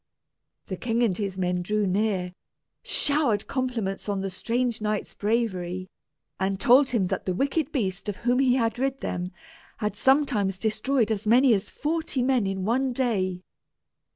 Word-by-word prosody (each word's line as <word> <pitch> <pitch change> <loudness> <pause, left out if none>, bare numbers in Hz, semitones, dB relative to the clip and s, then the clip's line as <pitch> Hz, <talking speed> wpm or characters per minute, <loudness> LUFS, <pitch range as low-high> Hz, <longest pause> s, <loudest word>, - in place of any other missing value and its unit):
The 185 - -5
king 235 +3 0
and 205 -6 +2
his 195 -1 -3
men 180 -1 0
drew 210 +3 0
near, 190 -2 0 0.5
showered 280 -8 +1
compliments 235 -7 -2
on 200 -1 -1
the 195 0 -3
strange 235 +4 -1
knight's 210 -1 -2
bravery, 185 -5 -2 0.5
and 190 0 -1
told 260 +5 +5
him 225 -6 +1
that - - -3
the 185 - 0
wicked 280 - 0
beast 200 - -2
of 200 - -4
whom 245 +1 +3
he 255 -2 +4
had 230 -2 0
rid 270 0 -1
them 180 0 -3 0.5
had 210 -2 -2
sometimes 245 -7 +2
destroyed 220 +3 0
as 215 0 -2
many 250 +3 +6
as 200 0 -1
forty 310 -4 -1
men 250 -5 +2
in 190 -1 -2
one 255 +4 +1
day. 190 -8 -1
215 Hz, 160 wpm, -26 LUFS, 190-255 Hz, 0.5 s, many